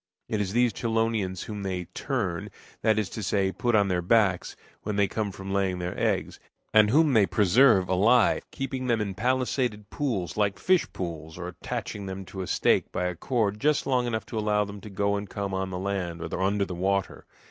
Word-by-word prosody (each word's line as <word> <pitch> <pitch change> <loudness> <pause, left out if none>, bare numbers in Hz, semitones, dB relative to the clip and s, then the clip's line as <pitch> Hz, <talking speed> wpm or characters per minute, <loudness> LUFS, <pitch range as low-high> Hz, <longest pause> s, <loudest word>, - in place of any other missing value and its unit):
It 110 -2 -1
is 95 -1 -2
these 120 0 +3
chelonians 110 -5 -1
whom 105 -2 -6
they 95 -2 -2
"turn" 105 -11 -2 0.3
that 110 -1 +3
is 105 -3 +1
to 110 - -5
say, 95 -1 +1
put 120 +5 0
on 100 -2 +4
their 90 -2 0
backs 95 -1 +2 0.3
when 105 -1 -3
they 100 -1 +3
come 105 0 -2
from 95 0 -6
laying 95 -2 +1
their 90 0 -3
eggs, - - -1 0.3
and 110 -1 +6
whom 150 +3 +4
they 105 -4 +5
preserve 100 +2 +4
alive, 105 +6 +4
keeping 130 -1 -4
them 120 -2 +2
in 100 -2 -2
palisaded 125 -2 -1
pools 105 - -2
like 100 -2 +1
fish 185 -1 +2
pools, 80 -3 -6
or 85 -1 -5
attaching 100 +2 -5
them 95 0 -6
to 95 +1 -7
a 90 - -4
stake - - +2
by 90 - -1
a 90 - -1
cord 105 +1 -1
just 150 +3 +2
long 125 -2 +1
enough 110 -2 -2
to 110 - -4
allow 105 -1 +1
them 100 0 -9
to 105 - -9
go 100 +1 0
and 100 -1 -4
come 100 -1 -4
on 95 0 -1
the 90 - -4
land 95 -3 -3
or 85 - -4
under 100 +1 +1
the 90 - -6
water. 95 +2 -1
100 Hz, 210 wpm, -27 LUFS, 95-115 Hz, 0.3 s, and